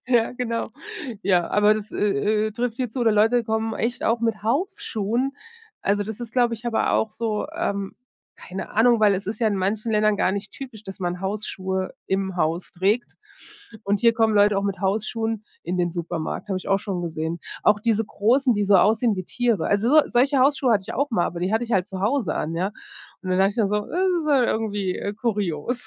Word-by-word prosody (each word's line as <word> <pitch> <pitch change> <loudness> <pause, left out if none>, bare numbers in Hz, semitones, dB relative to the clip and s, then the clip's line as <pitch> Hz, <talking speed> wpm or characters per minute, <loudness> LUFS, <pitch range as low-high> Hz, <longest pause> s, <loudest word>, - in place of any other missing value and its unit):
Ja, 240 -3 +2
genau. 230 -3 -3 0.5
Ja, 180 -3 +2
aber 210 +1 +4
das, 215 0 -6
äh, 210 +3 +1
äh, - - -3
trifft 240 0 -2
hier 255 -2 -1
zu. 255 - -4
Oder 230 -2 +4
Leute 225 +3 +3
kommen 220 0 -1
echt 235 +2 -2
auch 230 +1 +2
mit 225 -2 -1
Hausschuhen. 260 - -1 0.5
Also 205 +1 +1
das 220 +2 -7
ist, 235 -2 -7
glaube 240 -2 +2
ich 225 +2 -12
aber 230 - +1
auch 220 - +1
so, 220 0 -2
ähm 200 - -2 0.4
keine 190 +1 -7
Ahnung, 235 +2 +4
weil 210 -2 +4
es 190 +1 -4
ist 225 - -3
ja 230 - +2
in 210 - +1
manchen 210 +4 -1
Ländern 215 -1 +3
gar 185 - +1
nicht 200 +1 -4
typisch, 250 -6 -9
dass 195 -2 -8
man 180 -1 -3
Hausschuhe 190 -1 -3
im 190 0 -1
Haus 170 0 -1
trägt. 200 +7 0 0.7
Und 200 0 +1
hier 230 -1 +5
kommen 225 -1 +2
Leute 205 -1 +4
auch 200 - -2
mit 195 -3 -2
Hausschuhen 215 +2 -1 0.2
in 180 +2 -3
den 175 0 +2
Supermarkt, 170 +2 -4
habe 190 - -1
ich - - -11
auch 195 0 +2
schon 195 -5 -3
gesehen. 160 0 -3 0.2
Auch 210 0 +4
diese 225 0 +1
großen, 245 +6 +2
die 205 -1 0
so 200 0 +4
aussehen 215 +3 +3
wie 185 - -4
Tiere. 240 -1 0
Also, 205 +4 +2
so 310 +3 +7
solche 270 +3 +3
Hausschuhe 270 -2 +3
hatte 205 -3 +2
ich - - -6
auch 280 -2 -1
mal, 175 - +2
aber 170 - -5
die 185 +4 -1
hatte 225 - +1
ich 235 - -5
halt 190 -4 +2
zu 190 -2 -6
Hause 220 - 0
an, 165 +2 -3
ja. 190 +4 -1 0.5
Und 185 - -4
dann 185 - +2
dachte 195 +1 +4
ich 205 - -8
dann 210 -4 +2
so: 210 0 0
„Das 370 +2 0
ist 305 - -6
ja 275 -4 +4
irgendwie, 205 -5 -1
äh, 200 - -3
kurios." 210 -1 -2
215 Hz, 225 wpm, -23 LUFS, 195-235 Hz, 0.7 s, so